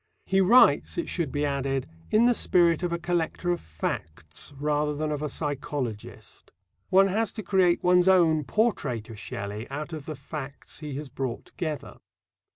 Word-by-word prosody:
He 195 0 +3
writes, 235 +7 +5
it 340 - -1
should 165 -6 -2
be 145 0 0
added, 135 -2 -1 0.2
in 220 +2 +4
the 245 - +5
spirit 170 -7 +3
of 175 -1 -1
a 170 - 0
collector 175 +1 -1
of 175 - -1
facts 80 - -5
rather 150 0 0
than 155 +1 -2
of 150 -1 -2
a 150 - -2
psychologist. 140 -6 -5 0.4
One 195 +1 +6
has 210 +2 0
to 215 - -6
create 180 -2 +3
one's 180 0 +4
own 165 -5 +5
portrait 125 - 0
of 110 - -9
Shelley 105 +3 -6
out 150 +4 -5
of 155 -3 -7
the 155 - -4
facts 140 0 -7
he 150 -3 -6
has 145 +1 -5
brought 130 -3 -4
together. 155 -4 -5
150 Hz, 170 wpm, -27 LUFS, 135-180 Hz, 0.4 s, One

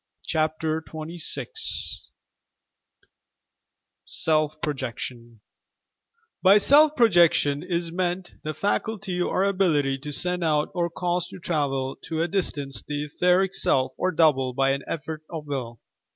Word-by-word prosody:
CHAPTER 155 0 -1
XXVI 160 - -3 2.0
SELF 155 -3 0
PROJECTION 120 -5 -5 1.0
By 195 +2 +7
"self 295 +7 +5
projection" 170 - +4
ia 170 -2 -2
meant 180 +1 -2
the 155 0 -4
faculty 200 0 -2
or 185 +1 +1
ability 160 -9 +1
to 150 +2 -7
send 180 +4 0
out 150 -2 +1
or 175 -1 0
cause 175 +1 -2
to - - -10
travel 140 -6 -2
to 160 0 -1
a - - 0
distance 145 - -1
the 145 0 -4
etheric 180 +5 +2
self 130 -6 +2
or 185 - 0
"double," 145 -6 +3
by 135 +1 +2
an 135 0 -1
effort 155 0 -5
of 160 -3 -6
will. 120 -5 -4
160 Hz, 125 wpm, -25 LUFS, 145-180 Hz, 2.0 s, By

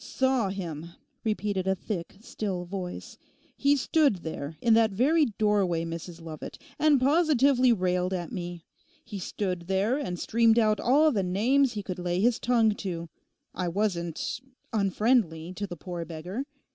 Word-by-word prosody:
'"Saw 260 -6 +1
him,"' 170 -4 -6 0.3
repeated 205 -3 -1
a 190 - +2
thick, 180 -3 -5
still 190 -5 -4
voice. 180 -1 -6 0.4
'He 280 +1 +3
stood 285 -2 +3
there, 160 -1 -5
in 230 +4 +3
that 225 0 +5
very 285 +10 +3
doorway, 195 -6 +2
Mrs 165 +1 -7
Lovat, 160 -2 -8 0.2
and 295 -2 +4
positively 275 -3 +4
railed 180 -3 +1
at 175 -3 -3
me. 175 -2 -6 0.4
He 210 -3 -6
stood 180 -2 -3
there 200 +8 +1
and 180 -11 -3
streamed 230 0 +3
out 215 -2 +3
all 295 +6 +4
the 210 -7 +1
names 240 +9 +2
he 205 -2 -4
could 185 -2 -5
lay 175 0 -1
his 230 +3 +2
tongue 230 -3 +3
to. 170 -4 -5 0.4
I 180 0 -2
wasn't—unfriendly 200 - -1
to 205 +2 -4
the 175 -2 -7
poor 175 +1 -5
beggar. 175 - -5
200 Hz, 150 wpm, -27 LUFS, 175-240 Hz, 0.4 s, that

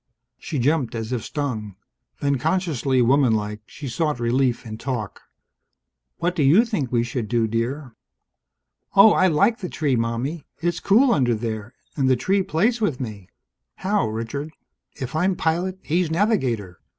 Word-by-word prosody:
She 150 - -4
jumped 135 -1 +1
as 115 +1 -4
if 125 -3 -2
stung. 115 -10 -4 0.5
Then, 140 -2 +1
consciously 150 -6 +1
womanlike, 110 -5 +2
she 145 - -8
sought 150 +1 -1
relief 120 +1 +1
in 110 -1 -7
talk. 120 -7 -4 1.0
"What 175 +2 -1
do 160 - 0
you 160 - +5
think 155 - -2
we 120 -2 +2
should 120 -2 -3
do, 115 +1 +1
dear?" 120 +3 -3 1.0
"Oh, 200 +2 +8
I 185 - +4
like 200 +8 +2
the 180 - -5
tree, 145 -4 0
Mommie. 120 +7 -2
It's 175 0 -1
cool 240 +6 +4
under 120 -4 +2
there. 110 +1 -5 0.2
And 135 -3 +1
the 130 - +5
tree 190 +11 +1
plays 215 +8 +1
with 160 - 0
me." 105 -7 -7 0.5
"How, 200 - 0
Richard?" 115 +7 -4 0.5
"If 130 +2 -5
I'm 180 +4 +2
pilot, 175 +3 -1
he's 170 +1 0
navigator. 130 - 0
135 Hz, 155 wpm, -23 LUFS, 115-170 Hz, 1.0 s, Oh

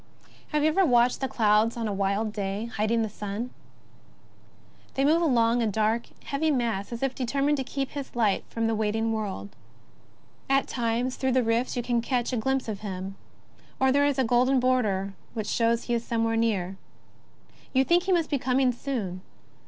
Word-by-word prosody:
Have 300 -1 0
you 310 - +5
ever 380 +5 +3
watched 245 -5 +3
the 265 - 0
clouds 220 0 +2
on 230 -1 -2
a 205 - -2
wild 200 +2 0
day 205 +2 -3
hid 215 +1 0
ing 230 0 +2
the - - -1
sun? 210 +3 -5 1.4
They 270 - +2
move 320 +4 +4
along, 240 -6 +3
a 230 - +1
dark, 220 +2 0 0.2
heavy 300 +3 0
mass, 235 -8 -1
as 235 +2 -4
if 270 -1 0
determined 275 +4 0
to 265 - -1
keep 270 +1 -3
his 280 -3 -7
light 215 -5 +2
from 230 0 -2
the 225 - +1
waiting 220 +1 0
world. 205 -2 -4 0.5
"* - - -33
At - - -9
times, 240 +1 -1
through 260 -1 0
the 255 -1 +3
rifts, 230 +3 0
you 240 - -1
catch 240 +1 0
a - - +1
glimpse 265 +3 0
of 210 -3 -4
him; 195 -2 -5 0.6
or 265 0 +4
there 285 +1 +4
is 285 -2 0
a 265 - +3
golden 250 +3 +3
border 215 -7 +1 0.2
which 215 -2 -2
shows 230 +1 +1
he 240 - -2
is 235 -1 0
somewhere 225 -1 0
near. 195 -5 0 0.9
You 265 0 +3
think 345 +5 +3
he 385 - 0
must 335 -4 +1
be 285 - +1
coming 255 0 +2
soon. 230 -8 -4
235 Hz, 190 wpm, -27 LUFS, 215-265 Hz, 1.4 s, you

